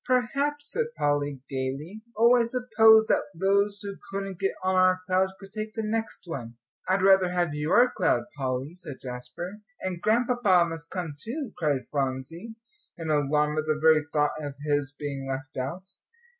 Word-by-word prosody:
"Perhaps," 280 Hz, +4 st, 0 dB
said 470 Hz, -1 st, +1 dB
Polly, 145 Hz, -2 st, 0 dB
gaily. 140 Hz, +9 st, -4 dB, 0.2 s
"Oh, 235 Hz, +2 st, +6 dB
I 245 Hz, -, +4 dB
suppose 225 Hz, -2 st, +5 dB
that -, -, +2 dB
those 200 Hz, +3 st, +2 dB
who 200 Hz, -1 st, -6 dB
couldn't 195 Hz, -2 st, -4 dB
get 195 Hz, -1 st, 0 dB
on 185 Hz, 0 st, +1 dB
our 185 Hz, 0 st, +4 dB
cloud 185 Hz, +1 st, +2 dB
could 195 Hz, 0 st, -13 dB
take 215 Hz, 0 st, -5 dB
the 220 Hz, -, -2 dB
next 225 Hz, +1 st, -3 dB
one." 120 Hz, -9 st, -6 dB, 0.3 s
"I'd 185 Hz, 0 st, +2 dB
rather 190 Hz, -2 st, +6 dB
have 175 Hz, -3 st, 0 dB
your 165 Hz, +12 st, +3 dB
cloud, -, -, +1 dB
Polly," 130 Hz, +2 st, -3 dB
said 170 Hz, -7 st, -9 dB
Jasper. 125 Hz, +11 st, -7 dB, 0.2 s
"And 185 Hz, -2 st, -4 dB
Grandpapa 225 Hz, -5 st, +3 dB
must 165 Hz, 0 st, -7 dB
come 175 Hz, -5 st, -4 dB
too," 260 Hz, +2 st, -4 dB
cried 145 Hz, -5 st, 0 dB
Phronsie, 140 Hz, -, -3 dB, 0.4 s
in 160 Hz, -2 st, -3 dB
alarm 150 Hz, +1 st, +2 dB
at 155 Hz, -, -3 dB
the 155 Hz, 0 st, +1 dB
very 160 Hz, 0 st, +5 dB
thought 150 Hz, -1 st, +2 dB
of 145 Hz, -1 st, -5 dB
his 145 Hz, -2 st, 0 dB
being 145 Hz, -2 st, -5 dB
left 135 Hz, +1 st, -5 dB
out. 175 Hz, +9 st, -5 dB
180 Hz, 170 wpm, -27 LUFS, 145-215 Hz, 0.4 s, Oh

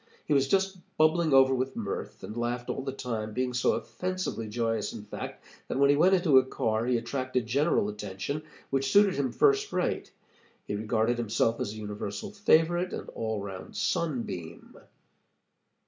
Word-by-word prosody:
He 150 Hz, -, +1 dB
was 135 Hz, -1 st, +3 dB
just 190 Hz, +2 st, +1 dB, 0.2 s
bubbling 155 Hz, +1 st, +3 dB
over 135 Hz, 0 st, +6 dB
with 130 Hz, +1 st, -1 dB
mirth, 105 Hz, -4 st, -5 dB
and 110 Hz, -, -6 dB
laughed 120 Hz, +1 st, -2 dB
all -, -, -3 dB
the 135 Hz, 0 st, -3 dB
time, 115 Hz, -5 st, -4 dB
being 125 Hz, 0 st, 0 dB
so 125 Hz, -, +2 dB
offensively 185 Hz, -11 st, -3 dB
joyous, 115 Hz, -2 st, -1 dB
in 105 Hz, -, -7 dB
fact, 105 Hz, -, -7 dB, 0.2 s
that -, -, -2 dB
when 140 Hz, +1 st, +5 dB
he -, -, +4 dB
went 185 Hz, +6 st, +5 dB
into 165 Hz, -8 st, +6 dB
a -, -, +1 dB
car, 115 Hz, -3 st, -1 dB
he 125 Hz, -1 st, +3 dB
attracted 130 Hz, +1 st, -2 dB
general 140 Hz, 0 st, +2 dB
attention, 105 Hz, +7 st, -4 dB, 0.3 s
which 135 Hz, 0 st, +1 dB
suited 200 Hz, -1 st, +6 dB
him 135 Hz, -3 st, -1 dB
first 415 Hz, -, +3 dB
rate. -, -, -1 dB, 0.5 s
He -, -, -4 dB
regarded 110 Hz, +3 st, 0 dB
himself 115 Hz, 0 st, +1 dB
as 100 Hz, -, -2 dB
a -, -, -9 dB
universal 105 Hz, -, -5 dB
favorite 175 Hz, -3 st, +3 dB
and -, -, -5 dB
all 110 Hz, -2 st, -3 dB
around 95 Hz, -2 st, -8 dB
sunbeam. 115 Hz, -, -3 dB
125 Hz, 170 wpm, -29 LUFS, 110-155 Hz, 0.5 s, over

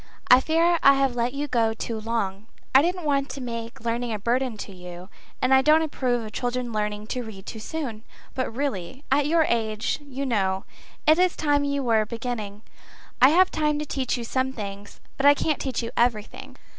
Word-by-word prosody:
I 250 Hz, -, +10 dB
fear 330 Hz, +4 st, +2 dB
I 275 Hz, 0 st, +7 dB
have 270 Hz, -2 st, +1 dB
let 240 Hz, +1 st, 0 dB
you 290 Hz, +1 st, -2 dB
go 225 Hz, -4 st, +1 dB
too 225 Hz, 0 st, -4 dB
long. 215 Hz, -2 st, -3 dB, 0.3 s
I 265 Hz, -, +8 dB
didn't 355 Hz, +3 st, -1 dB
want 280 Hz, -1 st, +1 dB
to 265 Hz, +2 st, -6 dB
make 230 Hz, -2 st, -6 dB
learning 235 Hz, +1 st, -2 dB
a 215 Hz, -, -1 dB
burden 240 Hz, +2 st, -1 dB
to 205 Hz, -, -7 dB
you, 180 Hz, 0 st, -10 dB, 0.3 s
and 255 Hz, +1 st, +4 dB
I 265 Hz, -, +7 dB
don't 310 Hz, +3 st, +5 dB
approve 250 Hz, -6 st, -1 dB
of 215 Hz, -, -8 dB
children 245 Hz, 0 st, -3 dB
learning 210 Hz, 0 st, -2 dB
to 250 Hz, -, -3 dB
read 210 Hz, -5 st, -10 dB
too 220 Hz, -, -7 dB
soon; 235 Hz, -4 st, -5 dB, 0.3 s
but 255 Hz, -2 st, -2 dB
really, 260 Hz, -1 st, -4 dB
at 285 Hz, +1 st, +3 dB
your 325 Hz, +1 st, +4 dB
age, 220 Hz, -3 st, -1 dB
you 280 Hz, -1 st, -5 dB
know, 195 Hz, -6 st, 0 dB, 0.4 s
it 310 Hz, +2 st, +5 dB
is 365 Hz, -1 st, +3 dB
time 290 Hz, -2 st, +1 dB
you 280 Hz, -1 st, -1 dB
were 220 Hz, -3 st, +2 dB
beginning. 225 Hz, -3 st, -5 dB, 0.6 s
I 260 Hz, -, +9 dB
have 370 Hz, +4 st, +4 dB
time 300 Hz, -1 st, 0 dB
to 300 Hz, -, -3 dB
teach 260 Hz, -3 st, -2 dB
you 240 Hz, -, -4 dB
some 260 Hz, +3 st, -1 dB
things, 200 Hz, -3 st, -8 dB, 0.2 s
but 275 Hz, -, +3 dB
I 285 Hz, -, +8 dB
can't 305 Hz, 0 st, -1 dB
teach 255 Hz, -3 st, -2 dB
you 230 Hz, -, -4 dB
everything. 230 Hz, -3 st, -1 dB
245 Hz, 205 wpm, -25 LUFS, 220-280 Hz, 0.6 s, I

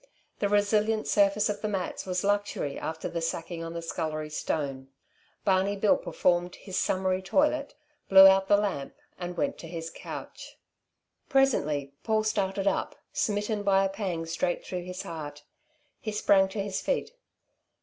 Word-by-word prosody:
The 200 Hz, -, +1 dB
resilient 210 Hz, +1 st, +2 dB
surface 200 Hz, +1 st, +3 dB
of 205 Hz, -1 st, -3 dB
the 215 Hz, -, -1 dB
mats 195 Hz, -2 st, -3 dB
was 180 Hz, 0 st, -1 dB
luxury 205 Hz, -8 st, 0 dB
after 160 Hz, 0 st, -4 dB
the 170 Hz, -, -3 dB
sacking 165 Hz, +1 st, -3 dB
on 165 Hz, 0 st, -6 dB
the 170 Hz, 0 st, -5 dB
scullery 155 Hz, -2 st, -3 dB
stone. 140 Hz, -3 st, -3 dB, 0.6 s
Barney 195 Hz, +1 st, +2 dB
Bill 200 Hz, +1 st, +4 dB
performed 175 Hz, 0 st, 0 dB
his 190 Hz, -, -8 dB
summary 185 Hz, 0 st, +1 dB
toilet, 285 Hz, +9 st, +1 dB, 0.3 s
blew 195 Hz, 0 st, +10 dB
out 195 Hz, 0 st, +6 dB
the 205 Hz, -, +5 dB
lamp 200 Hz, -10 st, -2 dB, 0.2 s
and 175 Hz, -1 st, -5 dB
went 280 Hz, -1 st, -1 dB
to 165 Hz, -, -8 dB
his 165 Hz, -1 st, -6 dB
couch. -, -, -9 dB, 0.7 s
Presently 150 Hz, -, +2 dB
Paul 220 Hz, -1 st, +1 dB
started 200 Hz, -2 st, -1 dB
up, -, -, 0 dB, 0.2 s
smitten 210 Hz, 0 st, 0 dB
by 195 Hz, -1 st, +3 dB
a -, -, 0 dB
pang 190 Hz, -5 st, -3 dB
straight 175 Hz, +2 st, -2 dB
through 180 Hz, -1 st, -4 dB
his 180 Hz, 0 st, -6 dB
heart. 150 Hz, -3 st, -7 dB, 0.6 s
He 215 Hz, -, -4 dB
sprang 200 Hz, -2 st, +4 dB
to 195 Hz, +1 st, -3 dB
his 200 Hz, -1 st, -3 dB
feet. -, -, -1 dB
190 Hz, 160 wpm, -28 LUFS, 170-205 Hz, 0.7 s, blew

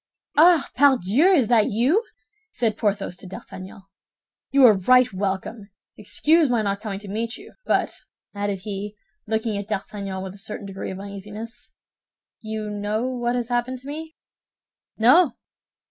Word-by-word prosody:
"Ah, 330 Hz, -1 st, +6 dB
pardieu! 265 Hz, -, +4 dB
Is 325 Hz, -, +4 dB
that 230 Hz, -3 st, +4 dB
you?" 265 Hz, -, +2 dB, 0.5 s
said 225 Hz, -3 st, 0 dB
Porthos 200 Hz, -3 st, -1 dB
to 190 Hz, -, -10 dB
D'Artagnan. 190 Hz, +1 st, -10 dB, 0.7 s
"You 275 Hz, -1 st, +6 dB
are 225 Hz, -, +8 dB
right 250 Hz, +4 st, +4 dB
welcome. 200 Hz, +2 st, -3 dB, 0.3 s
Excuse 320 Hz, -2 st, +2 dB
my 235 Hz, -3 st, +1 dB
not 200 Hz, 0 st, -2 dB
coming 210 Hz, -3 st, -4 dB
to 205 Hz, -, -10 dB
meet 225 Hz, +4 st, -3 dB
you; -, -, -14 dB
but," -, -, +1 dB, 0.4 s
added 200 Hz, -2 st, -3 dB
he, 205 Hz, +1 st, -5 dB, 0.3 s
looking 220 Hz, -1 st, -1 dB
at 200 Hz, -, -6 dB
D'Artagnan 200 Hz, -2 st, -4 dB
with 190 Hz, -1 st, -6 dB
a 200 Hz, -, -12 dB
certain 210 Hz, +1 st, -6 dB
degree 195 Hz, -1 st, -6 dB
of 190 Hz, -, -6 dB
uneasiness, 205 Hz, +3 st, -8 dB, 0.7 s
"you 220 Hz, -1 st, -4 dB
know 210 Hz, +2 st, -2 dB
what 245 Hz, -1 st, -1 dB
has 240 Hz, -1 st, -2 dB
happened 245 Hz, +1 st, -1 dB
to 260 Hz, +2 st, -12 dB
me?" 315 Hz, +2 st, -7 dB, 0.8 s
"No." 260 Hz, +8 st, +5 dB
220 Hz, 150 wpm, -23 LUFS, 200-250 Hz, 0.8 s, are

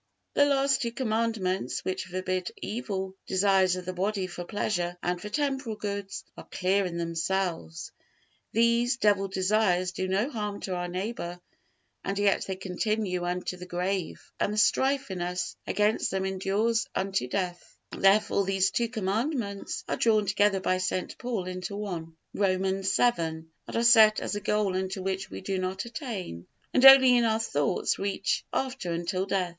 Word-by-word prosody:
The 285 Hz, -, +5 dB
last 275 Hz, -1 st, +2 dB
two 235 Hz, -, -1 dB
Commandments, 225 Hz, -6 st, -1 dB
which 185 Hz, 0 st, -2 dB
forbid 185 Hz, 0 st, -3 dB
evil 195 Hz, -5 st, -4 dB
desires 190 Hz, -1 st, +3 dB
of 180 Hz, -1 st, -6 dB
the 185 Hz, -, -4 dB
body 195 Hz, +1 st, -1 dB
for 175 Hz, -1 st, -6 dB
pleasure 180 Hz, -3 st, -2 dB
and 175 Hz, 0 st, -1 dB
for 210 Hz, -, -6 dB
temporal 270 Hz, -3 st, -1 dB
goods, 200 Hz, -1 st, -5 dB
are -, -, -11 dB
clear 190 Hz, +1 st, +1 dB
in 170 Hz, -1 st, -5 dB
themselves; 170 Hz, -, -2 dB, 0.6 s
these 235 Hz, +3 st, +3 dB
evil 200 Hz, -1 st, +4 dB
desires 190 Hz, -1 st, +1 dB
do 185 Hz, +1 st, -3 dB
no 195 Hz, +6 st, +1 dB
harm 210 Hz, -4 st, -3 dB
to 190 Hz, -, -3 dB
our 175 Hz, 0 st, -2 dB
neighbor, 180 Hz, -1 st, -4 dB, 0.6 s
and 195 Hz, -, -2 dB
yet 200 Hz, -1 st, +2 dB
they 190 Hz, -, -2 dB
continue 190 Hz, -1 st, -2 dB
unto 180 Hz, +1 st, -3 dB
the 180 Hz, 0 st, -9 dB
grave, 180 Hz, 0 st, -3 dB
and -, -, +1 dB
the 210 Hz, -, -3 dB
strife 265 Hz, +3 st, +2 dB
in 180 Hz, -2 st, -4 dB
us 180 Hz, 0 st, -3 dB
against 210 Hz, +1 st, +1 dB
them 190 Hz, 0 st, -1 dB
endures 200 Hz, +5 st, 0 dB
unto 190 Hz, -8 st, -1 dB
death; 175 Hz, +4 st, -4 dB
therefore 200 Hz, +1 st, +3 dB
these 195 Hz, 0 st, +1 dB
two 235 Hz, -, 0 dB
Commandments 220 Hz, 0 st, -2 dB
are -, -, -1 dB
drawn 215 Hz, -2 st, +3 dB
together 200 Hz, 0 st, +2 dB
by 185 Hz, 0 st, +1 dB
St. 185 Hz, 0 st, -2 dB
Paul 235 Hz, -7 st, -3 dB
into 185 Hz, +2 st, -5 dB
one, 170 Hz, -6 st, -5 dB, 0.2 s
Romans 190 Hz, 0 st, +1 dB
vii, 245 Hz, -, +5 dB
and 160 Hz, 0 st, -4 dB, 0.3 s
are 230 Hz, -, 0 dB
set 220 Hz, -3 st, +7 dB
as -, -, -3 dB
a 205 Hz, -, -3 dB
goal 210 Hz, -2 st, 0 dB
unto 190 Hz, 0 st, -2 dB
which 190 Hz, +1 st, -2 dB
we -, -, -7 dB
do 190 Hz, 0 st, -2 dB
not 185 Hz, +2 st, -3 dB
attain, 220 Hz, -, -6 dB, 0.3 s
and 255 Hz, -, +4 dB
only 265 Hz, -2 st, +10 dB
in 240 Hz, -, +3 dB
our 220 Hz, -1 st, +2 dB
thoughts 145 Hz, -10 st, 0 dB
reach 195 Hz, 0 st, -1 dB
after 260 Hz, -9 st, -2 dB
until 175 Hz, +3 st, -2 dB
death. 185 Hz, -2 st, 0 dB
195 Hz, 165 wpm, -28 LUFS, 185-215 Hz, 0.6 s, only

